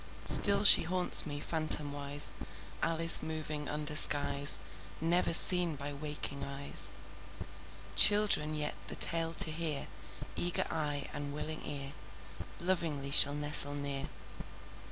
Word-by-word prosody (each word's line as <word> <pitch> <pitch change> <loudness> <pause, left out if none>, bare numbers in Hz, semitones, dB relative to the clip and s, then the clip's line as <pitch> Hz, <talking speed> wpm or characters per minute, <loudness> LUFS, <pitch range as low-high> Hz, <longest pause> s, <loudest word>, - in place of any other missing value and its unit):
Still 200 0 +7
she 205 - +6
haunts 180 0 +2
me, 145 -1 -7
phantomwise, 145 -2 -1 0.5
Alice 165 0 +3
moving 155 -2 -7
under 150 0 -5
skies 145 -1 +1 0.4
Never 170 +3 -2
seen 175 -1 +4
by 140 +1 -9
waking 145 -1 -8
eyes. 140 0 -1 1.0
Children 195 -7 +3
yet, 150 0 -5
the - - -6
tale 165 0 +1
to 160 - +2
hear, 155 -3 -2 0.5
Eager 175 0 -2
eye 145 -3 -5
and 145 0 -8
willing 155 +2 -7
ear, 140 -1 -6 0.7
Lovingly 165 -6 -4
shall 145 0 +5
nestle 145 -1 +3
near. 140 -1 -5
150 Hz, 115 wpm, -29 LUFS, 145-165 Hz, 1.0 s, Still